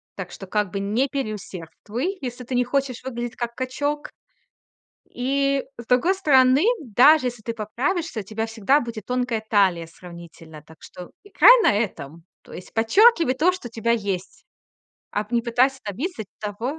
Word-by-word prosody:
Так 190 Hz, -2 st, -7 dB
что 195 Hz, -, -10 dB
как 210 Hz, -1 st, -1 dB
бы 200 Hz, -, -3 dB
не 215 Hz, +7 st, 0 dB
переусердствуй, 215 Hz, -, -5 dB
если 250 Hz, -1 st, -6 dB
ты 250 Hz, -, -4 dB
не 250 Hz, -, +3 dB
хочешь 255 Hz, -1 st, -2 dB
выглядеть 240 Hz, -2 st, -5 dB
как 235 Hz, -1 st, -4 dB
качок. 285 Hz, +3 st, -3 dB, 1.0 s
И 275 Hz, +2 st, 0 dB, 0.2 s
с 235 Hz, -, -11 dB
другой 255 Hz, +11 st, +3 dB
стороны, 270 Hz, -6 st, +4 dB, 0.2 s
даже 255 Hz, +3 st, +5 dB
если 240 Hz, -2 st, -8 dB
ты 230 Hz, +1 st, -4 dB
поправишься, 245 Hz, -, -3 dB
у -, -, -5 dB
тебя 215 Hz, +3 st, -4 dB
всегда 225 Hz, +5 st, +2 dB
будет 230 Hz, -5 st, -7 dB
тонкая 250 Hz, -3 st, -1 dB
талия 190 Hz, -6 st, +2 dB
сравнительно. 165 Hz, -2 st, -13 dB
Так 160 Hz, +1 st, -17 dB
что 180 Hz, -1 st, -11 dB
играй 485 Hz, +4 st, +6 dB
на 210 Hz, -, +4 dB
этом. 170 Hz, -7 st, -4 dB, 0.2 s
То -, -, -17 dB
есть 180 Hz, -, -11 dB
подчёркивай 330 Hz, -, +4 dB
то, 315 Hz, +7 st, +3 dB
что 365 Hz, -9 st, -7 dB
у -, -, -22 dB
тебя 230 Hz, +1 st, -1 dB
есть. 195 Hz, -5 st, -4 dB, 0.7 s
А 210 Hz, +1 st, -2 dB
п 235 Hz, -, -6 dB
не 235 Hz, -, +2 dB
пытайся 250 Hz, +3 st, +1 dB
добиться 220 Hz, -, -4 dB, 0.2 s
того 225 Hz, +8 st, -4 dB
235 Hz, 170 wpm, -23 LUFS, 205-270 Hz, 1.0 s, играй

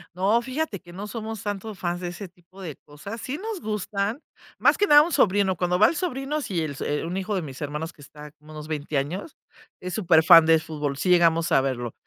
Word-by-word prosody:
No, 205 Hz, +6 st, +2 dB
fíjate 260 Hz, -, -4 dB
que 175 Hz, -2 st, -15 dB
no 195 Hz, +4 st, -7 dB
somos 220 Hz, -1 st, -6 dB
tanto 205 Hz, +1 st, -4 dB
fans 175 Hz, -1 st, -3 dB
de 175 Hz, -, -3 dB
ese 190 Hz, +3 st, -8 dB
tipo 180 Hz, +2 st, -18 dB
de 160 Hz, -6 st, -6 dB
cosas, 200 Hz, +10 st, -9 dB
sí 275 Hz, +4 st, -4 dB
nos 425 Hz, -1 st, -5 dB
gustan, 210 Hz, +3 st, -3 dB, 0.4 s
más -, -, +4 dB
que 410 Hz, -, +3 dB
nada 295 Hz, -5 st, +8 dB
a -, -, +6 dB
un 345 Hz, -, -4 dB
sobrino, 195 Hz, -5 st, +3 dB
cuando 180 Hz, +1 st, 0 dB
va 215 Hz, -, +7 dB
el -, -, -1 dB
sobrino, 300 Hz, -3 st, -2 dB
si 180 Hz, -9 st, -2 dB
el 150 Hz, -3 st, -4 dB
so, -, -, -6 dB
eh, 145 Hz, +2 st, -2 dB
un 175 Hz, -, -4 dB
hijo 195 Hz, +2 st, -3 dB
de 190 Hz, -, 0 dB
mis 135 Hz, -3 st, -9 dB
hermanos 150 Hz, +3 st, -4 dB
que -, -, -19 dB
está 150 Hz, +1 st, -12 dB
como 150 Hz, 0 st, -18 dB
unos 155 Hz, 0 st, -8 dB
20 150 Hz, -1 st, -3 dB
años, 175 Hz, -, -4 dB, 0.4 s
es 180 Hz, 0 st, -6 dB
súper 170 Hz, -6 st, +4 dB
fan 165 Hz, -1 st, +9 dB
de 160 Hz, 0 st, +5 dB
fútbol, 150 Hz, -3 st, -4 dB
sí 170 Hz, -, -3 dB
llegamos 170 Hz, -2 st, +3 dB
a 135 Hz, -, +5 dB
verlo. 120 Hz, -4 st, -3 dB
180 Hz, 245 wpm, -24 LUFS, 155-215 Hz, 0.4 s, fan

